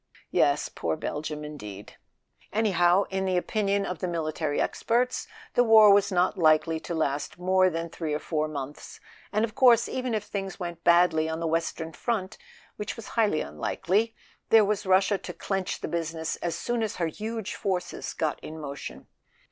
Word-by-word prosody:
(Yes—poor 80 -1 +1
Belgium, 150 - -4
in¬ 150 -1 -8
deed 105 -2 -9 0.3
!) - - -33
Anyhow, 190 -3 +3
in 190 0 -1
the 185 -1 +1
opinion 200 +1 0
of 180 -3 -4
the 185 - -2
military 155 -3 -2
experts 245 +2 0 0.3
the 245 - +4
war 220 -3 +8
was 200 0 +3
not 180 0 +1
likely 160 0 +4
to 170 - -5
last 145 -1 -1
more 185 +1 +3
than 165 -1 -3
three 160 -2 -3
or - - -2
four 155 -1 -1
months; 145 -1 -7 0.3
and 215 +2 +2
of 215 - -10
course, 240 -1 +5
even 255 -3 -2
if 210 - -1
things 195 -2 -5
went 170 -2 -6
badly 170 -2 +4
on 160 0 -3
the 165 - -2
western 165 0 -2
front, 205 -3 -3 0.4
which 210 - -4
was 230 - -9
highly 210 -9 +2
unlikely, 190 - -1 0.3
there 220 -2 +7
was 210 0 -1
Russia 190 +1 +3
to 180 - -7
clench 195 0 -3
the - - -3
business 165 -1 -3
as 170 - -3
soon 240 -1 -2
as 220 -2 -2
her 170 - -1
huge 215 +5 -4
forces 185 -3 -3
got 155 -2 -1
in 160 +1 -8
motion. 140 -2 -7
180 Hz, 180 wpm, -27 LUFS, 160-210 Hz, 0.4 s, war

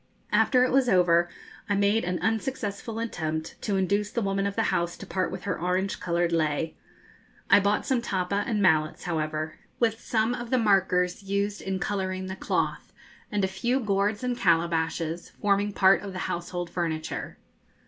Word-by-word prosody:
After 250 -2 +4
it 255 - +1
was 260 -2 +3
over 175 -2 +4 0.4
I 205 - +2
made 200 +2 +2
an 180 0 -1
unsuccessful 225 -1 -2
attempt 160 -9 -3
to 205 - -1
induce 200 +2 +1
the 235 - -2
woman 195 0 0
of 200 - -4
the 225 - +1
house 170 0 -1
to - - -9
part 185 -1 -1
with 185 0 -6
her - - -2
orange 185 +2 0
coloured 175 -1 0
lei. 160 -1 0 0.8
I - - +9
bought 205 +1 +1
some 260 -3 +1
tappa 200 -2 -1
and 210 -3 0
mallets, 155 -3 +2
however, 155 -2 -2 0.2
with 225 -1 +1
some 225 +1 +1
of 240 -1 -5
the 255 - +3
markers 190 -5 +2
used 200 +1 -1
in 190 0 -2
colouring 190 -1 -2
the 190 0 -5
cloth, - - -2 0.4
and 205 -1 0
a - - +3
few 235 +7 0
gourds 205 -1 0
and 250 -1 0
calabashes, 165 -4 0
forming 205 0 +2
part 195 -1 +5
of 195 -1 -7
the 185 - -5
household 175 0 -4
furniture. 160 -3 -3
195 Hz, 175 wpm, -27 LUFS, 175-210 Hz, 0.8 s, I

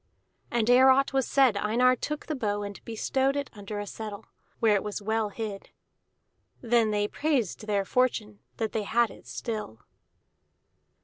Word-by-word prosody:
And 235 -2 0
ere 255 +2 +7
aught 275 +1 +4
was 270 -2 +1
said 265 -6 +4
Einar 235 +5 +3
took 300 +4 -4
the 310 - -3
bow 205 -6 -1
and 200 -1 -8
bestowed 265 +4 0
it 285 -1 -3
under 205 0 -6
a 205 - -4
settle, 210 0 -7 0.3
where 225 -2 +4
it 200 - +2
was 210 -1 -4
well 220 +1 -1
hid. 205 -2 -6 0.9
Then 235 -2 +2
they 205 -1 +1
praised 245 - -1
their 200 -2 +1
fortune 215 -4 0 0.2
that 220 -2 -2
they 220 - -1
had 230 +3 +1
it - - -15
still. 215 - -5
220 Hz, 165 wpm, -28 LUFS, 205-255 Hz, 0.9 s, ere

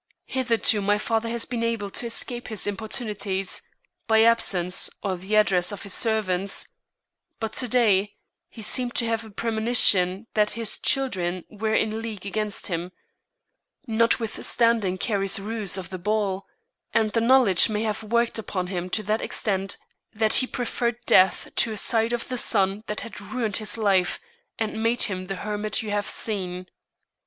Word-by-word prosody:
Hitherto 230 -5 +1
my 205 +1 +2
father 225 +1 -1
has 235 0 -1
been 240 -2 -4
able 225 -4 -2
to 235 - -2
escape 240 +1 -2
his 220 -3 -1
importunities, 205 -2 -2 0.5
by 220 0 +5
absence 190 -6 +2
or 195 -2 -1
the 190 +4 -3
address 190 -4 +3
of 205 - -7
his 200 - -6
servants, 200 -4 0 0.7
but 220 -1 -4
to 250 - 0
day 210 -4 +2 0.3
he 220 - -10
seemed 245 +3 0
to 235 - +2
have 225 0 -1
a 220 - -11
premonition 220 -3 +3
that 210 -1 +2
his 230 -3 -1
children 185 -10 0
were 220 +1 -1
in 220 0 0
league 215 -4 -7
against 210 +1 -2
him, 175 0 -3 0.9
notwithstanding 230 -3 +1
Carrie's 195 -1 0
ruse 210 -1 -1
of 185 0 -7
the 185 - -5
ball, 200 -1 -1 0.5
and 220 -2 +2
the 230 - +1
knowledge 230 -6 +5
may 215 0 -1
have 215 -1 -2
worked 235 +1 0
upon 185 -4 -3
him 180 0 -3
to 215 +3 -1
that 215 +2 0
extent 195 -2 -2 0.3
that 215 0 +2
he 255 - -2
preferred 240 -1 -2
death 185 +1 +4
to 230 - +2
a 215 - -5
sight 225 +2 +2
of 240 -1 -3
the 255 -1 -3
son 200 -1 +1
that 210 - -4
had 225 - -8
ruined 220 -1 -2
his 215 0 0
life 195 -5 +2 0.4
and 220 0 -3
made 230 +2 +2
him 185 -3 -2
the 195 - -3
hermit 210 +3 -2
you 215 - -5
have 205 0 -1
seen." 185 -4 -3
215 Hz, 165 wpm, -25 LUFS, 195-230 Hz, 0.9 s, by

